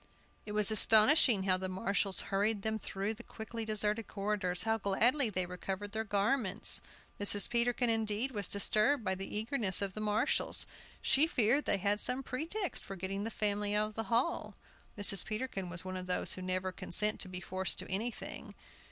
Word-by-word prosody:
It 210 - -5
was 210 0 +5
astonishing 220 0 +5
how 185 -1 +2
the 185 0 -5
marshals 190 +1 0
hurried 205 +1 0
them 220 0 -2
through 195 +1 -4
the 225 - -11
quickly 225 -1 -8
deserted 215 0 0
corridors, 195 -3 -2
how 225 0 0
gladly 230 +7 +1
they 185 -3 -2
recovered 190 +3 -6
their 220 +1 -3
garments! 205 0 +2 0.4
Mrs. 205 0 +5
Peterkin, 240 +1 +1
indeed, 225 +2 0
was 205 -4 -2
disturbed 215 +6 +2
by 190 - -1
the 195 +2 -6
eagerness 220 -3 +2
of 195 -1 -2
the 215 - -6
marshals; 215 +6 0 0.4
she 285 +4 +4
feared 250 +1 +1
they - - +2
had 200 +2 0
some 255 +5 +1
pretext 330 +10 -4
for 195 - -8
getting 195 +2 -4
the - - -3
family 205 -1 -1
out 210 0 0
of - - -15
the 225 +1 -4
hall. 240 +9 -1 0.4
Mrs. 200 -1 +3
Peterkin 215 -4 -5
was 180 +1 -4
one 185 0 -5
of 185 0 -6
those 180 - 0
who 185 - -7
never 185 0 -2
consent 210 +4 +1
to 190 - -1
be 180 0 -3
forced 190 +1 -1
to - - -1
anything. 220 +5 -4
210 Hz, 185 wpm, -32 LUFS, 195-225 Hz, 0.4 s, was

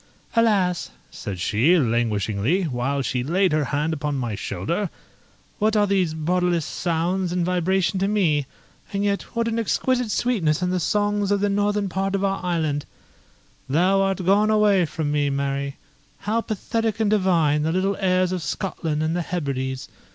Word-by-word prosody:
"Alas!" 200 -6 +2 0.2
said 100 -5 -6
she, 120 - +3
languishingly, 115 - +1
while 135 -1 -1
she 125 0 -1
laid 180 +7 +2
her 150 -1 +1
hand 150 +4 -1
upon 150 -1 -2
my 120 -5 -2
shoulder, 170 - -2 0.7
"what 215 +1 +2
are 205 - +4
these 185 -5 +1
bodiless 175 0 0
sounds 175 +2 -1
and 175 -1 0
vibration 180 +1 +1
to 195 - +1
me? 165 -9 +1 0.4
and 200 0 -1
yet 200 -1 +1
what 230 0 +1
an 230 0 -1
exquisite 250 +2 0
sweetness 185 -10 +1
in 180 - 0
the 185 - 0
songs 205 +2 0
of 205 0 +2
the 205 +1 +1
northern 205 0 +1
part 195 +1 -1
of 195 - -1
our 195 -1 -1
island: 160 -5 -1 0.9
'Thou 185 +7 +3
art 195 -2 0
gone 205 +3 +4
awa' 205 -5 +4
from 150 -1 -3
me, 145 -1 +1
Mary!' 140 0 -2 0.5
How 220 +2 0
pathetic 225 0 -2
and 215 -2 +2
divine 170 -7 +3
the 160 +2 0
little 190 +3 +1
airs 185 -2 +2
of 185 -1 -2
Scotland 155 -2 -2
and 160 +1 0
the 175 - 0
Hebrides! 135 -6 -3
180 Hz, 165 wpm, -23 LUFS, 150-200 Hz, 0.9 s, are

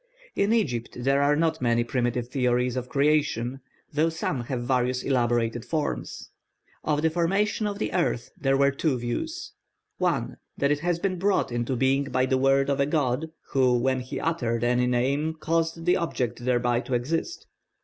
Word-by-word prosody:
In 200 +2 +2
Egypt 130 - 0
there 135 +2 +3
are 145 +1 +3
not 160 -1 0
many 120 -1 +2
primitive 120 0 -1
theories 125 -1 +1
of 125 -1 -4
creation, 140 -3 +1 0.3
though 155 +3 +2
some 145 -6 -3
have 125 -1 -3
various 125 0 0
elaborated 120 -3 +1
forms. 155 -2 -3 0.5
Of 150 0 0
the 160 - +3
formation 195 +6 +1
of 205 -1 -3
the 215 - -3
earth 170 -9 0
there 135 0 +1
were 140 0 +4
two 140 -1 0
views. 320 - -4 0.5
(1) - - 0 0.2
That 140 +1 +2
it 145 - +1
had 170 +1 -1
been 185 -3 0
brought 195 -7 +1
into 120 +2 -1
being 135 +3 +2
by 130 -1 +1
the 130 0 +1
word 135 +1 +3
of 140 - 0
a 140 - +2
god, 150 0 0 0.2
who 130 -2 +3
when 130 +2 +1
he 125 0 -5
uttered 120 -8 -1
any 125 +1 +2
name 140 +6 0
caused 165 +1 -1
the 180 - +4
object 125 -8 -2
thereby 120 -1 +2
to 125 0 -2
exist. 160 - -2
135 Hz, 175 wpm, -26 LUFS, 125-160 Hz, 0.5 s, were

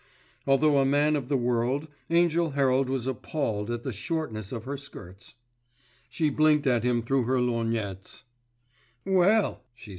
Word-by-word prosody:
Although 140 +1 +4
a - - +4
man 145 +2 +2
of 140 -3 -4
the 140 - +2
world, 125 +4 0 0.2
Angell 170 -2 +2
Herald 135 -1 +2
was 130 -2 -2
appalled 120 -5 -3
at 120 0 -3
the 130 - -4
shortness 110 - -4
of 115 -3 -5
her 140 +3 -4
skirts. 105 -11 -11 0.7
She 150 +3 0
blinked 150 0 +3
at 120 -4 +2
him 120 -1 +1
through 130 +1 0
her 130 +2 +1
lorgnettes. 115 -5 -3 0.8
"Well!" 195 +3 +2
130 Hz, 145 wpm, -27 LUFS, 120-150 Hz, 0.8 s, Although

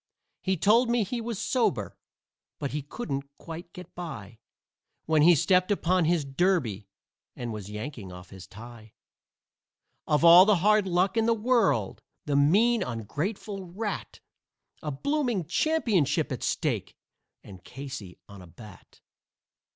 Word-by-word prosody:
He 190 -1 0
told 230 +8 +4
me 240 -2 +2
he 235 +5 -4
was 230 -2 -4
sober, 110 - -1 0.6
but 140 - -4
he 150 - -3
couldn't 140 - -5
quite 170 +1 -9
get 180 0 -12
by 115 - -8 0.7
When 155 -1 +3
he 170 +3 +7
stepped 180 +5 +2
upon 185 -3 +1
his 165 -2 +1
derby 135 - 0 0.5
and 120 -2 -5
was 105 -2 -7
yanking 105 -2 -7
off 90 0 -12
his 95 -2 -11
tie. 110 0 -13 1.1
Of 150 +2 +2
all 175 +2 +9
the 210 0 +4
hard 210 +2 +3
luck 185 +4 +1
in 225 0 +2
the 230 - +3
world! 220 - +1 0.2
The 145 - -1
mean, 210 +12 +4
ungrateful 165 - -4
rat! 205 +4 -5 0.6
A 155 - -4
blooming 240 - -1
championship 180 - +1
at 130 - -4
stake - - -2 0.5
and 95 -3 -13
Casey 130 -8 -8
on 100 -2 -12
a 90 - -13
bat." 95 +3 -15
165 Hz, 140 wpm, -27 LUFS, -, 1.1 s, all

